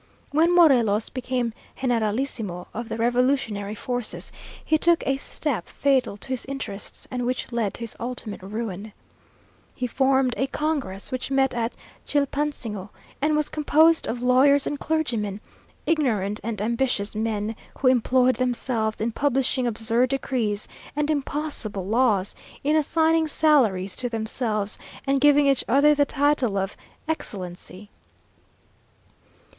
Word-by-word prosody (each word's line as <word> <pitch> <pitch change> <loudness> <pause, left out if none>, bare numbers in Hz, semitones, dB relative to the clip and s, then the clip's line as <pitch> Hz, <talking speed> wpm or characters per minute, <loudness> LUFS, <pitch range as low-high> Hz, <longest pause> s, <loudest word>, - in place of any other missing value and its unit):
When 330 +4 +3
Morelos 240 -11 +4
became 250 -2 -2 0.3
generalissimo 225 -6 -1
of 235 +1 -5
the - - -3
revolutionary 235 -4 +1
forces, 245 +1 -3 0.3
he 315 - +3
took 335 +2 +3
a 270 0 +1
step 270 - -3
fatal 270 -7 +1
to 210 - -10
his 260 -2 -2
interests, 260 -7 -6
and 250 -1 -2
which 250 0 -2
led 225 -4 -1
to - - -6
his 230 - -4
ultimate 235 -4 -3
ruin. 210 0 -5 0.8
He 255 - -2
formed 265 0 +2
a 270 - +1
congress, 275 -11 -3
which 255 0 -3
met 270 -1 +2
at 235 0 -1 0.3
Chilpansingo, 280 -8 -1 0.3
and 300 +1 +2
was 300 -1 +1
composed 315 +2 +3
of 240 +1 -3
lawyers 275 +3 +5
and 290 - -3
clergymen; 235 -11 -1 0.5
ignorant 215 - +1
and 220 -2 -3
ambitious 235 -2 0
men, 215 0 -2 0.2
who 265 - +1
employed 255 0 +3
themselves 240 -3 -1
in 225 +2 -1
publishing 265 -1 +1
absurd 230 +2 +1
decrees 240 -6 -1 0.3
and 300 +1 +1
impossible 280 -9 -2
laws, 215 -3 +2 0.3
in 300 +2 +2
assigning 320 +1 +2
salaries 235 -13 +2
to 245 - -2
themselves, 220 -2 -2 0.3
and 275 -1 +1
giving 290 0 +6
each 275 -2 +3
other 285 +4 +5
the 290 -1 +3
title 280 -8 +1
of 195 0 -2 0.3
Excellency. 195 - -3
250 Hz, 130 wpm, -24 LUFS, 215-280 Hz, 0.8 s, giving